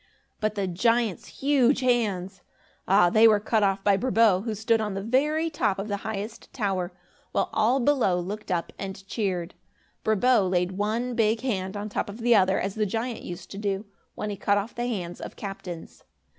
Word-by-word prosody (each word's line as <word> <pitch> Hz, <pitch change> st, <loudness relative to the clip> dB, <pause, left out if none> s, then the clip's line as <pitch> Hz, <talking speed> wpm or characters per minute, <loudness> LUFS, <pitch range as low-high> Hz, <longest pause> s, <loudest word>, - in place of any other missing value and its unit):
But 215 Hz, -1 st, -1 dB
the 200 Hz, -2 st, -1 dB
giant's 225 Hz, +3 st, +1 dB
huge 275 Hz, -1 st, +2 dB
hands! 205 Hz, -7 st, 0 dB, 0.5 s
Ah, 185 Hz, -2 st, +5 dB
they 220 Hz, +3 st, +7 dB
were 215 Hz, -2 st, +5 dB
cut 215 Hz, +1 st, +1 dB
off 195 Hz, -1 st, +1 dB
by 200 Hz, -1 st, +4 dB
Brabo, 220 Hz, -5 st, +3 dB
who 220 Hz, -2 st, -2 dB
stood 220 Hz, +2 st, +1 dB
on 210 Hz, -2 st, -2 dB
the 195 Hz, -, -3 dB
very 300 Hz, +8 st, +1 dB
top 290 Hz, -10 st, 0 dB
of 200 Hz, +2 st, -4 dB
the 200 Hz, -, -1 dB
highest 215 Hz, +2 st, -6 dB
tower, 195 Hz, -6 st, -1 dB, 0.4 s
while -, -, 0 dB
all 235 Hz, +5 st, +3 dB
below 240 Hz, -9 st, +2 dB
looked 205 Hz, +5 st, -6 dB
up 175 Hz, -2 st, -1 dB
and 195 Hz, 0 st, -6 dB
cheered. 190 Hz, -4 st, -2 dB, 0.5 s
Brabo 220 Hz, -2 st, +3 dB
laid 180 Hz, 0 st, +1 dB
one 220 Hz, +6 st, -1 dB
big 225 Hz, -1 st, +2 dB
hand 195 Hz, -6 st, -2 dB
on 205 Hz, +1 st, -4 dB
top 205 Hz, -, -3 dB
of 215 Hz, +4 st, -8 dB
the 240 Hz, +1 st, +4 dB
other, 190 Hz, -3 st, +4 dB
as 195 Hz, 0 st, -2 dB
the 215 Hz, 0 st, 0 dB
giant 225 Hz, +4 st, -3 dB
used 175 Hz, -1 st, -8 dB
to 195 Hz, -, -6 dB
do, 200 Hz, 0 st, -2 dB, 0.3 s
when 210 Hz, -, -3 dB
he -, -, -3 dB
cut 205 Hz, +1 st, +2 dB
off 205 Hz, +3 st, -3 dB
the 240 Hz, +1 st, -2 dB
hands 180 Hz, -7 st, -4 dB
of -, -, -7 dB
captains. 185 Hz, -4 st, -8 dB
210 Hz, 195 wpm, -26 LUFS, 195-230 Hz, 0.5 s, they